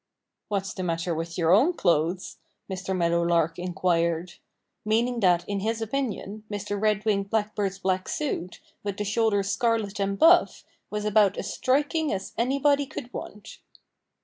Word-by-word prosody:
"What's 195 -2 -2
the - - -5
matter 170 -1 -1
with 165 +1 -4
your 165 -1 +2
own 260 - +5
clothes?" 175 - 0 0.3
Mr. 190 0 -3
Meadowlark 170 -1 +1
inquired 175 -1 0 0.5
meaning 235 +3 +1
that 175 -4 +3
in 200 -1 -2
his 225 +3 -1
opinion 220 -3 -3
Mr. 205 -1 -4
Red 215 -1 +1
winged 200 -2 +1
Blackbird's 205 -2 -1
black 185 -1 -1
suit, 220 - -3 0.2
with 200 -1 -4
the 210 - -2
shoulders 205 -2 +1
scarlet 225 -4 0
and 195 0 -1
buff, 340 - +5 0.3
was 210 0 -3
about 210 -2 +3
as - - -4
striking 290 +4 +1
as 195 0 -4
anybody 280 +4 +2
could 250 -1 -8
want. 210 +1 -8
200 Hz, 150 wpm, -26 LUFS, 180-225 Hz, 0.5 s, own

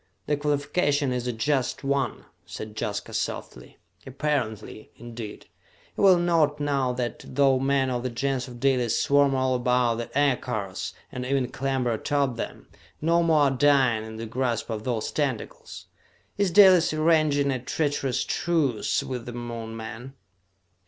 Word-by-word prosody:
"The 150 - +1
qualification 145 -1 0
is 125 -1 -2
a - - 0
just 130 +4 -1
one," 140 0 -1 0.2
said 110 0 -8
Jaska 105 -1 -4
softly. - - -5 0.3
"'Apparently,' 130 -6 -3
indeed! 115 -2 -9 0.5
You - - -2
will 190 -2 +7
note 165 -4 +2
now 140 -3 0
that, 125 -1 -4
though 135 -1 +2
men 135 -1 +1
of 120 -1 -1
the 130 - -2
Gens 130 +2 -2
of 120 -1 -10
Dalis 125 -3 +2
swarm 140 -1 +3
all 130 0 +1
about 125 -2 +1
the 120 +2 -5
aircars, 110 -10 -1 0.2
and 125 - -5
even 130 -1 0
clamber 130 -2 -1
atop 140 +2 0
them, 115 - -6 0.3
no 170 +2 +2
more 160 -3 +3
are 140 -2 +4
dying 130 -4 +3
in 110 0 -8
the 115 - -5
grasp 120 0 -2
of 110 -1 -4
those 120 -4 -2
tentacles? 135 -7 -4 0.5
Is 200 -2 +1
Dalis 185 -2 +6
arranging 155 -3 +2
a 130 - -1
treacherous 140 0 -1
truce 155 -10 0
with 125 -2 -5
the 120 - -6
Moon 115 -2 -6
men?" 120 +4 -8
130 Hz, 150 wpm, -26 LUFS, 120-145 Hz, 0.5 s, will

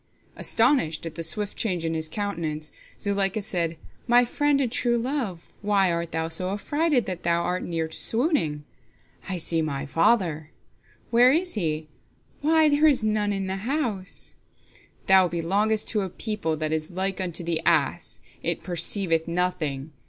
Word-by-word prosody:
Astonished 165 - +2
at 165 - -5
the 165 - -6
swift 205 +5 0
change 180 -7 -2
in 165 - -1
his 160 -1 -1
countenance, 160 -6 -4 0.3
Zuleika 200 0 0
said, 170 -5 -1 0.3
"My 245 0 +5
friend 290 +3 +1
and 255 -4 0
true 240 -1 +1
love, 235 - -3
why 200 -3 +2
art 170 0 -3
thou 160 0 -2
so 175 +3 0
affrighted 290 +6 0
that 185 -2 -4
thou 170 0 +1
art 180 +1 -1
near 165 -2 -2
to 160 - -4
swooning? 225 - +2 0.6
Joseph: - - -8
"I 185 - -2
see 165 0 +1
my 145 -3 -3
father!" 165 - +1 0.2
Zuleika: - - -34
"Where 245 +2 +6
is 355 +5 +1
he? 155 -5 -2 0.5
Why, 315 +1 +4
there 295 +1 +4
is 275 -7 +3
none 210 -1 +1
in 195 -1 -2
the 190 0 -3
house." 225 -4 -3
Joseph: - - -30
"Thou 190 -1 +6
belongest 200 +6 0
to 215 - +1
a 190 - -3
people 205 -6 -2
that 155 0 -2
is 155 0 -2
like 190 +1 -2
unto 175 -2 -2
the 165 -1 -1
ass, - - +1 0.2
it - - -1
perceiveth 170 -1 +1
nothing. 165 -5 -2
185 Hz, 170 wpm, -25 LUFS, 165-220 Hz, 0.6 s, Where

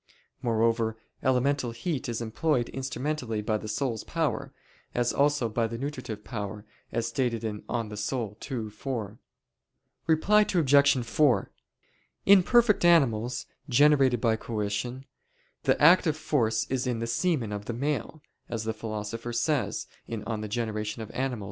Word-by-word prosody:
Moreover, 115 -1 +1 0.2
elemental 130 0 +1
heat 125 +4 -3
is 115 0 -3
employed 120 +2 0
instrumentally 130 -3 -3
by 110 0 0
the 110 - -7
soul's 115 +1 -2
power, - - -2 0.4
as 120 0 +1
also 145 -3 +2
by 115 +1 0
the 115 +1 -5
nutritive 130 -6 -5
power, 105 -2 -5 0.3
as 115 0 -1
stated 120 -2 -1
(De 105 -2 -4
Anima 110 -3 -2 0.2
ii, 115 -1 -4
4). 110 -2 -5 0.9
Reply 185 +7 +4
Obj. 140 - +4
4: 120 -5 +2 0.7
In 200 -1 +8
perfect 230 0 +4
animals, 125 -8 +3 0.2
generated 135 -2 +5
by 115 -1 +2
coition, 115 +4 -3 0.6
the - - +3
active 160 0 +5
force 115 -8 +1
is 130 -1 0
in 125 -2 0
the 115 - -2
semen 120 - 0
of 105 0 -5
the - - -3
male, 145 +3 -3 0.3
as 115 -2 -3
the 110 0 -2
Philosopher 110 +1 -5
says 120 -2 0 0.2
(De 115 - -3
Gener. 110 0 -3
Animal. 130 -3 -2
120 Hz, 135 wpm, -28 LUFS, 110-140 Hz, 0.9 s, In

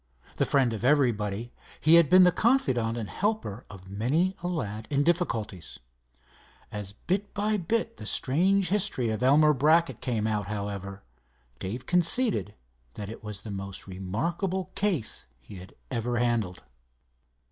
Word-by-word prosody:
The - - +1
friend 130 -4 +2
of 110 - -5
everybody, 120 -5 +1 0.3
he 155 - +4
had 170 -4 +7
been 185 0 +8
the 180 - +6
confidant 130 - +1
and 110 -3 -4
helper 185 - -2
of 95 -2 -12
many 135 - 0
a 175 - -3
lad 110 - -4
in 145 -1 +2
difficulties. 115 - -1 0.9
As 105 -1 -6
bit 195 - -3
by 210 +1 +1
bit 225 +5 -1
the - - -7
strange 185 +7 +2
history 190 - +1
of 110 - -3
Elmer 150 +4 +5
Brackett 150 -1 +2
came 115 -5 -1
out, 105 -2 -1
however, 100 -2 -5 0.6
Dave 120 +7 -5
conceded 180 - +2 0.4
that 105 -1 -6
it 115 - -10
was 105 -1 -6
the 110 - -7
most 100 -1 -6
remarkable 165 - -3
case 175 - -1
he 65 +10 -12
had 90 +1 -12 0.2
ever 120 0 -1
handled. 115 -7 0
125 Hz, 145 wpm, -27 LUFS, -, 0.9 s, been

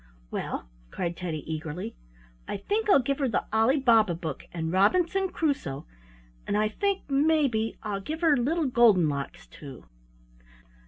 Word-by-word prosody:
"Well," - - -4 0.2
cried 170 - -3
Teddy, 165 -4 -4
eagerly, 160 -2 -5 0.5
"I - - -3
think 420 - -1
I'll 280 -10 +6
give 275 +3 -1
her 275 - +1
the 225 - -1
Ali 225 +6 +3
Baba 225 -9 +4
book 160 -4 -6
and 160 -1 -3
Robinson 355 - +2
Crusoe, 285 - -2 0.6
and 205 - 0
I 215 0 +2
think, 395 - -2
maybe, 275 -6 +1
I'll 205 -2 -3
give 315 - -5
her 320 -3 +5
Little 305 +7 0
Golden 235 - +5
Locks 145 +4 -4
too." 135 -4 -12
220 Hz, 150 wpm, -27 LUFS, -, 0.6 s, I'll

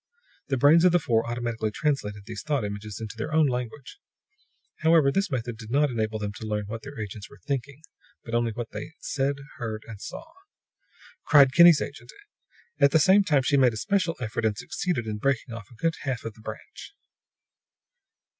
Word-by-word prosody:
The 135 - 0
brains 150 +6 +6
of 180 - +6
the - - +6
four 115 -7 0
automatically 120 -2 -2
translated 105 -5 -2
these 115 - -6
thought 145 -7 -1
images 105 +1 -6
into 110 0 -7
their 115 +7 -4
own 155 0 +4
language. 125 - -4 0.8
However, 160 -3 +4
this 195 +4 0
method 120 -4 -4
did 110 -1 -9
not 145 +2 +2
enable 110 -2 -1
them 105 -1 -4
to - - -9
learn 105 -1 -2
what 115 +2 -6
their 140 -3 -9
agents 105 -1 -7
were - - -15
thinking, 140 +1 -4 0.4
but 115 - -9
only 120 -1 +1
what 115 +1 -6
they 160 - -7
said, 140 0 -1 0.2
heard, 110 -2 -5
and 105 -3 -9
saw.] - - -7 1.0
cried 140 -4 +6
Kinney's 170 -2 +8
agent; 140 - -9 0.7
at 140 -1 +6
the 150 - +4
same 190 +5 +5
time 145 -7 +2
she 140 +2 +2
made 130 -3 +4
a - - -5
special 185 - 0
effort, 115 -2 -3
and 110 -2 +1
succeeded 180 - -2
in 105 -1 -4
breaking 130 0 -1
off 115 -3 -9
a 120 - -16
good 165 +8 0
half 130 -4 -3
of 115 - -5
the 110 - -18
branch. 110 - -9
125 Hz, 190 wpm, -26 LUFS, 110-145 Hz, 1.0 s, Kinney's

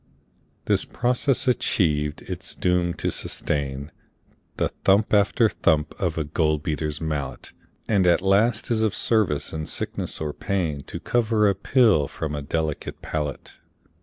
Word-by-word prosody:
This - - +2
process 125 +2 0
achiev'd, 75 -11 +1
it - - -6
is - - -1
doom'd 90 -1 0
to - - -1
sustain 70 +1 -3 0.7
The - - +1
thump 100 +3 +3
after 105 +2 +4
thump 80 -6 +1
of 85 -4 -1
a 80 - 0
gold 75 0 0
beater's 75 -1 -2
mallet, 75 -3 -4 0.4
And 100 -4 +3
at 85 - +5
last 105 +5 +2
is 110 -1 +2
of 110 -2 +1
service 90 -11 +1
in 80 -1 -4
sickness - - -3
or 75 -2 -3
pain 85 -7 -2
To - - -6
cover 110 -3 +2
a 100 - +3
pill 105 - +3
from 75 +1 -5
a 75 - -3
delicate 75 +1 -3
palate. 75 -3 -4
85 Hz, 150 wpm, -24 LUFS, 75-105 Hz, 0.7 s, at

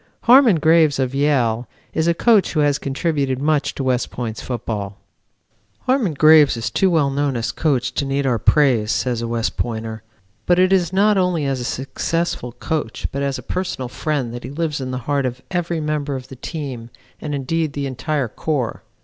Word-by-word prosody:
Harmon 245 -4 +6
Graves 160 -2 +4
of 130 -1 -1
Yale 125 -5 +1 0.3
is 160 +1 0
a 170 - +3
coach 220 +1 +3
who 155 - +2
has 145 -1 +2
contributed 140 -2 -1
much 150 +2 0
to 135 - -3
West 130 -1 0
Point's 115 -3 -5
football. 105 -5 -4 0.8
"Harmon 250 - +1
Graves 155 -3 +6
is 115 - -3
too 190 - +2
well 155 -5 +2
known 140 0 0
now - - -2
as 120 +2 -2
coach 135 -3 0
to - - -1
need 140 0 -1
our 120 -4 +1
praise," 120 -5 +3
says 120 -3 -1
a 115 - -3
West 115 0 -2
Pointer, 110 -2 -3 0.5
"but 175 - +4
it 185 +1 +4
is 175 -4 +2
not 200 +1 +3
only 180 -5 +1
as 135 -1 -1
a - - -4
successful 135 +1 -2
coach, 145 -2 -3
but 140 - -3
as 140 -1 -1
a - - -9
personal 180 -9 -3
friend 135 -2 -2
that 120 - -7
he 125 - -6
lives 150 0 -2
in 130 - -4
the 130 - -3
heart 140 -2 +1
of 125 +1 -7
every 175 -2 -1
member 150 -2 -2
of 130 0 -7
the 135 - -9
team 130 -4 -6 0.3
and 150 -2 -3
indeed 150 +3 -1
the 140 -1 -3
entire 135 +1 -2
corps. 130 +1 -3
140 Hz, 200 wpm, -20 LUFS, 125-160 Hz, 0.8 s, Harmon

